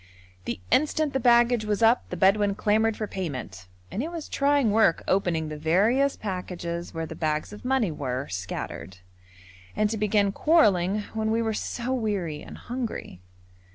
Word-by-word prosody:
The 115 Hz, -4 st, -3 dB
instant 305 Hz, 0 st, +2 dB
the 265 Hz, -, +1 dB
baggage 240 Hz, -1 st, +4 dB
was 210 Hz, +1 st, -1 dB
up 230 Hz, +2 st, +4 dB
the 180 Hz, -, -5 dB
Bedouin 200 Hz, +2 st, +3 dB
clamoured 215 Hz, +1 st, +1 dB
for 215 Hz, -, -2 dB
payment, 130 Hz, -, -6 dB, 0.2 s
and 220 Hz, -, -2 dB
it 310 Hz, -, -3 dB
was 335 Hz, -3 st, -6 dB
trying 280 Hz, -5 st, +2 dB
work 215 Hz, -5 st, +3 dB
opening 170 Hz, -5 st, +1 dB
the 150 Hz, -1 st, -6 dB
various 215 Hz, -, +2 dB
packages 175 Hz, -3 st, -5 dB
where 165 Hz, 0 st, -4 dB
the -, -, -7 dB
bags 155 Hz, +4 st, -2 dB
of 210 Hz, -, -11 dB
money 250 Hz, -7 st, +1 dB
were 130 Hz, -3 st, -3 dB
scattered, 95 Hz, 0 st, -6 dB, 0.8 s
and 215 Hz, 0 st, +1 dB
to 225 Hz, -, -2 dB
begin 205 Hz, -1 st, +2 dB
quarrelling 205 Hz, -, +3 dB
when 220 Hz, 0 st, -1 dB
we 225 Hz, +1 st, +1 dB
were 220 Hz, -1 st, -1 dB
so 245 Hz, +4 st, -3 dB
weary 200 Hz, -11 st, -2 dB
and -, -, -10 dB
hungry. 240 Hz, -, -5 dB
210 Hz, 165 wpm, -26 LUFS, 170-235 Hz, 0.8 s, baggage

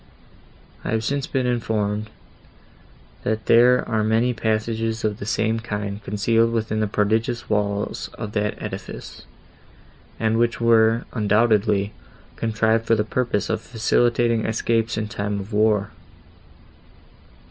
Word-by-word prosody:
I -, -, -4 dB
have 110 Hz, 0 st, 0 dB
since 140 Hz, +3 st, -1 dB
been 130 Hz, -2 st, -1 dB
informed, 110 Hz, -3 st, -1 dB, 1.1 s
that 110 Hz, 0 st, -2 dB
there 125 Hz, +2 st, +5 dB
are 110 Hz, -1 st, 0 dB
many 115 Hz, +3 st, +2 dB
passages 110 Hz, 0 st, -1 dB
of 105 Hz, -1 st, -1 dB
the 100 Hz, -, -6 dB
same 110 Hz, +1 st, 0 dB
kind 105 Hz, -2 st, -4 dB
concealed 115 Hz, +3 st, +1 dB
within 110 Hz, -1 st, -1 dB
the 110 Hz, -, +1 dB
prodigious 110 Hz, +4 st, 0 dB
walls 105 Hz, 0 st, -1 dB
of 110 Hz, -3 st, -6 dB
that 105 Hz, -1 st, -1 dB
edifice, -, -, -8 dB, 0.9 s
and 110 Hz, 0 st, +1 dB
which 115 Hz, -2 st, +1 dB
were, 115 Hz, 0 st, +4 dB
undoubtedly, 105 Hz, -2 st, +2 dB, 0.4 s
contrived 110 Hz, 0 st, +1 dB
for 115 Hz, -, +4 dB
the 105 Hz, -, +1 dB
purpose 115 Hz, -1 st, -1 dB
of -, -, -1 dB
facilitating 115 Hz, 0 st, +1 dB
escapes 115 Hz, +1 st, 0 dB
in 110 Hz, 0 st, -2 dB
time 105 Hz, -2 st, -3 dB
of 100 Hz, +3 st, -8 dB
war. 105 Hz, -1 st, +2 dB
110 Hz, 125 wpm, -22 LUFS, 105-115 Hz, 1.1 s, there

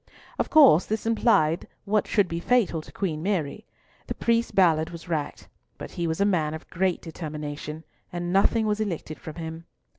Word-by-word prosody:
Of -, -, 0 dB
course 270 Hz, -, +7 dB
this 220 Hz, +1 st, -2 dB
implied 220 Hz, -8 st, +2 dB, 0.2 s
what 210 Hz, +1 st, +1 dB
should 205 Hz, -4 st, +2 dB
be 170 Hz, 0 st, -3 dB
fatal 195 Hz, -5 st, +2 dB
to -, -, -14 dB
Queen 160 Hz, -6 st, -3 dB
Mary. 190 Hz, +1 st, -2 dB, 0.4 s
The -, -, -3 dB
priest 235 Hz, 0 st, 0 dB
Ballard 160 Hz, -4 st, +4 dB
was 170 Hz, 0 st, -10 dB
racked, 155 Hz, -4 st, -3 dB, 0.3 s
but -, -, -8 dB
he 170 Hz, -1 st, -2 dB
was 160 Hz, +2 st, -2 dB
a 200 Hz, -, +3 dB
man 160 Hz, -6 st, +1 dB
of 160 Hz, -, -10 dB
great 185 Hz, 0 st, 0 dB
determination, 150 Hz, -1 st, -6 dB, 0.3 s
and 175 Hz, 0 st, -3 dB
nothing 220 Hz, +3 st, +3 dB
was 210 Hz, 0 st, 0 dB
elicited 170 Hz, -7 st, -4 dB
from 155 Hz, -, -8 dB
him. 165 Hz, 0 st, -7 dB
175 Hz, 180 wpm, -26 LUFS, 160-205 Hz, 0.4 s, course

